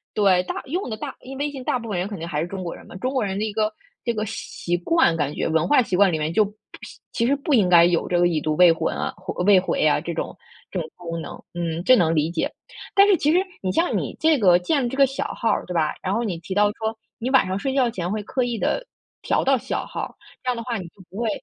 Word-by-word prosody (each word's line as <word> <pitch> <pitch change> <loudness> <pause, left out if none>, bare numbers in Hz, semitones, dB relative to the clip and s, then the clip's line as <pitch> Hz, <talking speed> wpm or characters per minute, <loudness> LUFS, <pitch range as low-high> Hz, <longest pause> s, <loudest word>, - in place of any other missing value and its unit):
对， 195 -3 +4
大 - - -4
用 330 +1 -3
的 215 - -4
大 - - -6
因 265 +1 -9
为 290 - -1
微 295 - -2
信 265 -3 -7
大 255 - 0
部 230 -2 -8
分 180 -4 -1
人 185 - -1
肯 205 -2 -6
定 165 +1 -6
还 150 -2 -2
是 170 - -2
中 190 0 -6
国 170 - -5
人 - - -14
嘛， - - -12
中 255 +7 -2
国 260 - +1
人 195 -1 -2
的 215 - 0
一 210 - -4
个 215 0 +1 0.3
这 235 - 0
个 215 0 -1
习 175 -4 -4
惯 175 - +3
感 145 -2 -1
觉， - - -1
文 160 0 +1
化 290 -3 +5
习 185 - -2
惯 195 -1 +5
里 160 - 0
面 155 +2 -2
就 215 - +5
不 205 - -6 0.3
是 - - -11
其 230 - 0
实 280 - +3
不 285 +1 -2
应 200 -7 +4
该 170 -1 +7
有 175 -1 +1
这 175 - +1
个 175 - +5
已 160 -3 0
读 155 -1 -1
未 180 -1 +7
婚 165 0 -2 0.5
未 200 -2 +7
回 180 - 0
啊， 150 - +3
这 170 - -4
种 165 - -4 0.4
这 185 - -2
种 160 - -5
功 165 -2 -5
能， - - -7 0.2
嗯， 170 -1 -3
这 255 - +7
能 165 -5 +2
理 155 +2 +1
解。 165 - -1 0.4
但 400 +1 +7
是 400 - +6
其 300 - +2
实 350 - +4 0.2
你 185 -1 -1
像 335 - +1
你 - - -3
这 315 -3 +3
个 180 -5 +6
建 245 - 0
这 265 - -6
个 275 - +7
小 270 +1 -3
号， 225 -2 +1
对 180 - -4
吧？ 155 -2 +1
然 185 - -2
后 235 - 0
你 180 -7 -3
提 180 +3 -6
到 205 0 +5
说 220 +1 -4 0.2
你 245 +3 -2
晚 265 -6 +5
上 190 +1 -1
睡 270 +3 -2
觉 255 -3 +3
前 180 -2 -3
会 215 0 -2
刻 255 +4 -1
意 240 -2 -2
地 - - -1 0.4
调 - - +1
到 270 0 +3
小 255 +3 -3
号， - - -5 0.3
这 255 - -1
样 250 - +1
的 - - -3
话 235 -2 -2
你 185 - -5
就 190 - -19
不 190 - -16
会 230 -1 0
200 Hz, 315 characters per minute, -23 LUFS, 175-250 Hz, 0.5 s, 该